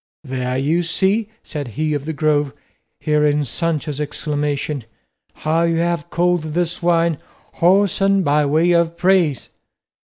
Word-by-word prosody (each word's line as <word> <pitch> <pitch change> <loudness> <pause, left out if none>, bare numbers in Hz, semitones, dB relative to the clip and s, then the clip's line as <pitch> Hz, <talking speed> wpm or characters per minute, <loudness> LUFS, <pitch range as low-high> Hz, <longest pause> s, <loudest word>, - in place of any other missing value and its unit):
"There, 130 -2 -3
you 155 +6 +1
see," 195 +5 0
said 145 -4 -5
he 155 0 0
of 145 -1 -3
the 160 - -2
Grove, 150 -2 +1 0.5
hearing 150 -1 +2
Sancho's 150 0 -2
exclamation, 145 -2 -2 0.6
"how 160 +2 +2
you 170 0 +2
have 170 -1 -1
called 175 0 +1
this 175 0 -1
wine 170 -2 +2 0.4
whoreson 195 +2 +3
by 145 -1 +2
way 160 +5 +3
of 170 -1 +2
praise." 180 - +2
160 Hz, 130 wpm, -19 LUFS, 145-175 Hz, 0.6 s, whoreson